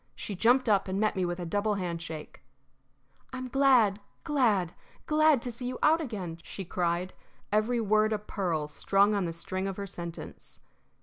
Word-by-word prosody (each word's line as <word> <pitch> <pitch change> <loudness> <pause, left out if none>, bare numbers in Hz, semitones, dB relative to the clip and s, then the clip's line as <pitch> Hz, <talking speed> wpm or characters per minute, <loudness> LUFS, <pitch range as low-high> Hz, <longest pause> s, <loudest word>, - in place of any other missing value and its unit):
She 210 - -5
jumped 245 +7 +3
up 200 -3 +3
and 190 +1 -2
met 215 0 +1
me 185 -1 0
with 175 +1 -3
a 175 - -4
double 205 +4 0
handshake. 170 -4 -5 0.9
"I'm 255 0 -5
glad, 245 -7 +4 0.2
glad, 220 - +2 0.3
glad 305 -4 +4
to 245 - -3
see 245 +2 -6
you 250 0 -4
out 320 +2 +5
again!" 190 - -5
she 190 +3 -7
cried, 175 +1 -1 0.4
every 215 +3 +2
word 215 0 +2
a 215 - +1
pearl 180 -7 -2
strung 195 +7 +2
on 200 -3 0
the 170 - -2
string 185 +3 -3
of 195 - -4
her 200 - -4
sentence. 170 -3 -8
200 Hz, 175 wpm, -29 LUFS, 180-240 Hz, 0.9 s, out